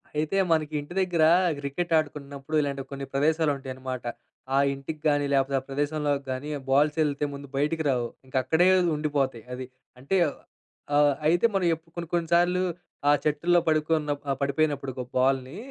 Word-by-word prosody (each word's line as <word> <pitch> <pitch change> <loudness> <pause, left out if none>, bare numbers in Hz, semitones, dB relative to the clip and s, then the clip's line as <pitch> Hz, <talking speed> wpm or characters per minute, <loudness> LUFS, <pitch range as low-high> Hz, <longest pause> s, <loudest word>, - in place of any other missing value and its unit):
అయితే, 155 +5 0
మనకి 155 -1 +1
ఇంటి 145 +5 -10
దగ్గర 175 -4 +1 0.4
క్రికెట్ 165 +5 -3
ఆడుకున్నప్పుడు, 145 -1 -4
ఇలాంటి 140 -1 -3
కొన్ని 140 0 -5
ప్రదేశాలు 155 +2 +2
ఉంటాయన్నమాట. 130 -1 -6 0.5
ఆ - - +4 0.2
ఇంటికి 150 +3 -7
గాని, 145 -1 +2
లేకపోతే 135 0 +2
ఆ - - -21
ప్రదేశంలోకి 145 0 -1
గాని, 135 +4 -4
ఆ - - -8
బాల్స్ 150 +3 +3
ఎళ్తే, 145 -1 -1
ముందు 140 0 -8
బయటికి 160 +3 0
రావు. 120 -3 +1 0.2
ఇంకా 130 0 -3
అక్కడే 160 +7 +3 0.3
ఉండిపోతాయి 140 -6 -1
అది. 130 - -6 0.4
అంటే, 165 +9 0 0.8
ఆహ్, 145 -1 +5
అయితే 175 +7 +3
మనం 190 - +2
ఏప్ 165 +1 -7
కొన్ని, 170 -1 -5
కొన్ని 170 -2 0
సార్లు, 180 +1 +3 0.5
ఆ - - +7
చెట్టులో 170 +4 +3
పడుకున్నప్ 155 -2 +1
ఆ - - +3
పడిపోయినప్పుడు, 140 -1 0
ఒక 125 -1 -4
బాల్‌ని, 130 +4 +1
145 Hz, 160 wpm, -26 LUFS, 135-160 Hz, 0.8 s, ఆ